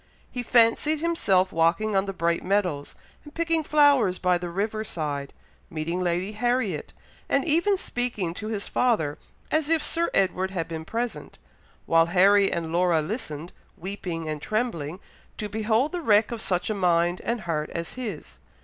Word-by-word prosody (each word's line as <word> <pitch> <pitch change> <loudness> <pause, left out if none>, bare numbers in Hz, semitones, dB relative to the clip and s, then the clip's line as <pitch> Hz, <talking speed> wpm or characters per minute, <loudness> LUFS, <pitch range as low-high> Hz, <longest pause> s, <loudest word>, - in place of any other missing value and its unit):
He 250 - -3
fancied 245 +6 +3
himself 200 - +2
walking 170 +6 +2
on 195 +1 +2
the - - -1
bright 170 -2 0
meadows, 180 -8 -1 0.3
and 295 - -14
picking 330 -1 +1
flowers 285 -11 +4
by 180 -1 +2
the 175 0 -5
river 210 +4 -2
side, 145 -7 -4 0.4
meeting 165 +3 -3
Lady 180 +3 -1
Harriet, 220 - -1 0.4
and 275 - +2
even 345 +6 +2
speaking 240 - -2
to 215 +4 -6
his 215 -2 -4
father, 190 -13 +1 0.3
as 310 -1 +1
if 325 -2 +3
Sir 335 +2 0
Edward 190 0 +1
had 180 -4 -3
been 160 -1 -6
present; 235 +5 -4 0.5
while 165 0 +4
Harry 195 +3 +5
and 165 -2 -3
Laura 175 -2 +3
listened, 155 - -5 0.2
weeping 175 -3 -5
and 155 -1 -4
trembling, 185 -8 -2 0.4
to 210 - -3
behold 220 +6 +1
the 355 -1 -3
wreck 215 -6 +3
of 235 -2 -4
such 180 +1 -1
a - - +1
mind 175 -2 +1
and 235 -1 -2
heart 160 -4 -2
as 170 -1 -5
his. 220 -11 -7
195 Hz, 165 wpm, -25 LUFS, 170-240 Hz, 0.5 s, Harry